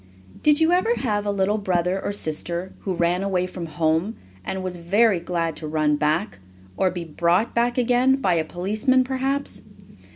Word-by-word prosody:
Did 300 0 +4
you 320 +1 +3
ever 370 +7 +2
have 210 -5 -1
a - - +2
little 200 +2 +1
brother 185 -1 0
or - - -1
sister 175 0 -3
who 190 -2 -3
ran 175 +2 +1
away 190 -2 0
from 180 -2 -6
home, 165 +6 0 0.3
and 190 - -4
was 185 -1 -4
very 195 +3 +3
glad 170 -2 -2
to 155 - -6
run 150 -1 +1
back, 150 - -1 0.4
or 190 - +2
be 175 -1 -5
brought 170 +6 +1
back 240 +1 +1
again, 250 +2 +3
by 200 -10 +1
a 165 -2 +1
policeman, 215 - +1
perhaps? 270 +2 -2
190 Hz, 175 wpm, -23 LUFS, 170-235 Hz, 0.4 s, Did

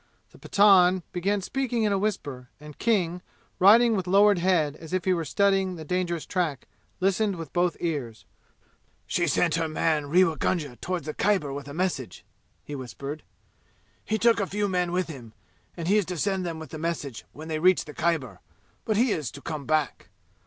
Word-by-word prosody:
The - - -18
Pathan 190 -3 +5
began 195 +3 0
speaking 250 0 -1
in 210 - +2
a - - +2
whisper 145 -12 -3
and 150 0 -11
King, 180 -6 +1 0.4
riding 225 +4 +6
with 185 -3 -2
lowered 200 +1 +5
head 170 -5 +2
as 160 +1 -10
if 185 -2 -1
he 185 - +3
were 170 -2 -1
studying 195 +1 +1
the 160 -2 -8
dangerous 175 -1 -2
track, 170 -8 -2 0.3
listened 195 +2 +1
with 165 -4 -8
both 175 -1 +1
ears. 140 -10 -4 0.8
"She 175 -1 0
sent 170 -2 +2
her 165 -1 0
man 155 -1 0
Rewa 170 -1 +3
Gunga 150 -8 -1
toward 180 -3 -3
the 155 +1 -5
Khyber 190 -9 +1
with 140 0 -6
a 140 - -8
message," 165 - -3 0.4
he 145 - -8
whispered. 140 +3 -6 0.8
"He 220 - -1
took 230 +1 +3
a 195 - 0
few 205 +2 -1
men 180 -2 0
with 180 0 0
him, 125 -8 -10 0.4
and 170 -1 -4
he 205 +3 +4
is 205 - +2
to 180 0 -5
send 190 0 -1
them 165 -1 -4
with 160 0 -9
the 155 - -6
message 150 -8 -4
when 155 +2 -10
they 155 -1 -2
reach 185 +2 +4
the 150 - -10
Khyber, 145 - -1 0.5
but 215 -2 0
he 240 +1 +3
is 155 -8 -2
to 140 - -11
come 150 -2 -6
back. 155 -1 -1
175 Hz, 195 wpm, -26 LUFS, 155-195 Hz, 0.8 s, riding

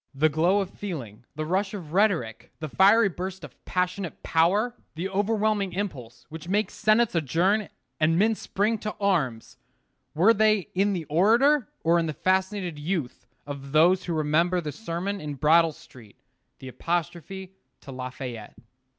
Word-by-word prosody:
The 155 +3 +3
glow 170 +7 +2
of 190 - -5
feeling, 125 - -7
the 155 +1 -3
rush 195 +5 -1
of 165 -6 -9
rhetoric, 175 - 0
the 155 - -4
fiery 200 +7 +5
burst 185 +1 -6
of - - -13
passionate 180 0 -2
power 195 +9 +2 0.2
the 170 +4 -3
overwhelming 205 -1 0
impulse 145 - -6
which 160 +1 -9
makes 210 +3 0
senates 215 +2 +2
adjourn 175 - +1 0.3
and 160 +1 +3
men 220 +4 +3
spring 215 +1 -1
to 215 +1 -5
arms 150 - -1 0.6
were 190 +9 +5
they 215 -5 +2
in 200 +2 +1
the 170 -4 -3
orator 230 - +3
or 170 +1 +3
in 165 - -1
the 155 - -3
fascinated 185 -3 -1
youth 155 -4 -4 0.2
of 140 -1 -8
those 180 +4 +4
who 175 - -2
remember 160 +4 +1
the 155 -3 -4
sermon 190 +4 -4
in 150 -1 -5
Brattle 160 +3 +4
Street, 120 -7 -16 0.4
the 130 - -11
apostrophe 175 +6 -4 0.3
to 135 - -10
Lafayette? 125 -3 -7
175 Hz, 155 wpm, -26 LUFS, 155-200 Hz, 0.6 s, fiery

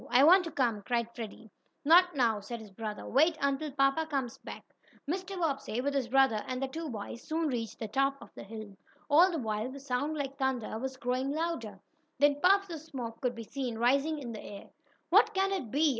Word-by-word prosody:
"I 255 0 +5
want 360 +4 +7
to 330 - -5
come!" 235 -7 0
cried 235 +1 -1
Freddie. 220 -2 -8 0.3
"Not 355 +2 +6
now," 230 -5 +2
said 235 +4 -6
his 210 -3 -13
mother. 215 -1 -5
"Wait 310 +6 +3
until 280 +2 0
papa 275 +3 +2
comes 270 -6 -3
back." - - -9 0.4
Mr. 375 +4 -3
Bobbsey, 275 -8 -1
with 280 +3 -1
his 270 -4 0
brother 255 -4 +3
and 255 -1 -3
the 270 - -1
two 320 +3 -5
boys, 230 0 -6
soon 320 0 -1
reached 230 -4 -3
the 220 - -4
top 275 +5 +1
of - - -14
the - - -9
hill. 215 -1 -9 0.4
All 340 +6 +7
the 340 - -2
while 220 -2 -2
the 280 - -8
sound 280 +3 -2
like 275 -1 -4
thunder 255 -5 -1
was 265 +1 -4
growing 255 +2 -1
louder. 285 - -3 0.4
Then 285 +1 +3
puffs 390 0 +4
of 320 - -5
smoke 250 -7 -7
could 250 -2 0
be 230 - -6
seen 245 0 -4
rising 275 +7 +2
in 255 -5 -6
the 215 - -7
air. 200 -1 -10 0.4
"What 430 +3 +5
can 385 +1 +2
it 330 - -2
be?" 300 +6 +3
270 Hz, 215 wpm, -31 LUFS, 230-310 Hz, 0.4 s, want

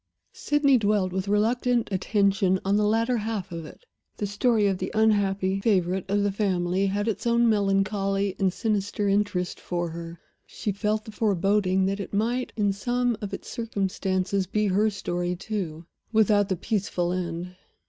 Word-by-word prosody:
Sydney 280 -3 +2
dwelt 205 -3 +1
with 190 +1 -2
reluctant 235 +3 +1
attention 195 0 +2
on 195 +1 +2
the 210 0 +3
latter 230 +3 +2
half 215 -4 -3
of 165 -2 -6
it. 485 - -15 0.3
The 210 - -2
story 210 +2 +2
of 195 -2 +1
the 185 - -3
unhappy 200 -3 +2
favorite 190 -3 +1
of 205 +1 +2
the 205 - +1
family 190 -1 0
had 205 +2 -1
its 220 +1 -2
own 235 0 +4
melancholy 195 -1 +1
and 190 -2 +2
sinister 205 -1 -1
interest 195 -3 0
for 175 -1 -3
her. 170 0 -8 0.3
She 210 - -3
felt 210 +2 -1
the 220 - -8
foreboding 195 -2 +1
that 195 +1 -1
it 200 - -5
might, 240 +5 0
in 205 -2 +1
some 245 +3 0
of 205 - -5
its - - -7
circumstances, 195 -4 -1
be 210 +3 0
her 205 +2 +2
story 180 -3 -2
too 175 -5 -5 0.3
without 210 -2 +3
the 190 - +1
peaceful 180 -2 -1
end. 180 0 -4
200 Hz, 165 wpm, -26 LUFS, 185-215 Hz, 0.3 s, own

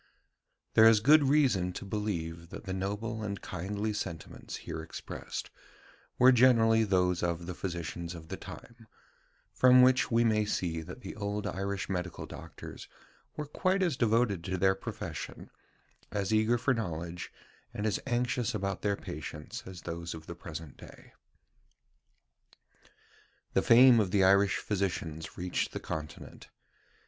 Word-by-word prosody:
There 110 0 +8
is 110 -2 +5
good 145 +6 +6
reason 125 -12 +3
to - - -7
believe 85 -5 -3
that - - -8
the 95 -3 -4
noble 105 +4 -3
and 100 -2 -4
kindly 100 +4 -3
sentiments 80 -7 -6
here 80 - -6
expressed 80 - -7 0.7
were 125 +1 +7
generally 115 -3 +5
those 90 -3 +2
of 85 -1 -1
the 90 - -4
physicians 85 -1 -5
of 80 -1 -11
the - - -3
time; 115 -1 -11 0.7
from 125 0 +7
which 130 0 +4
we 115 0 +3
may 110 -2 +3
see 85 -5 -2
that 90 +9 -9
the - - -7
old 105 0 -3
Irish 100 +1 -3
medical 90 -2 -4
doctors - - -10 0.5
were 150 - -3
quite 185 +6 0
as 170 -6 +1
devoted 115 -6 +2
to 95 0 -2
their 95 +1 +4
profession, - - -7 0.6
as 100 0 -1
eager 110 +2 +3
for 130 +3 +2
knowledge, 85 -6 -4 0.4
and 105 - -4
as 105 -2 +1
anxious 120 -1 0
about 100 -2 -2
their 100 -1 +1
patients 75 -5 -7
as 90 -2 -9
those 85 0 -5
of 80 0 -10
the 85 - -7
present 80 -4 -9
day. - - -14 2.4
The - - +3
fame 120 0 +7
of 100 -4 +1
the 95 +1 +3
Irish 100 +1 +5
physicians 85 -6 -3
reached 90 0 -2
the - - -3
Continent. 75 -1 -7
100 Hz, 145 wpm, -30 LUFS, 85-115 Hz, 2.4 s, There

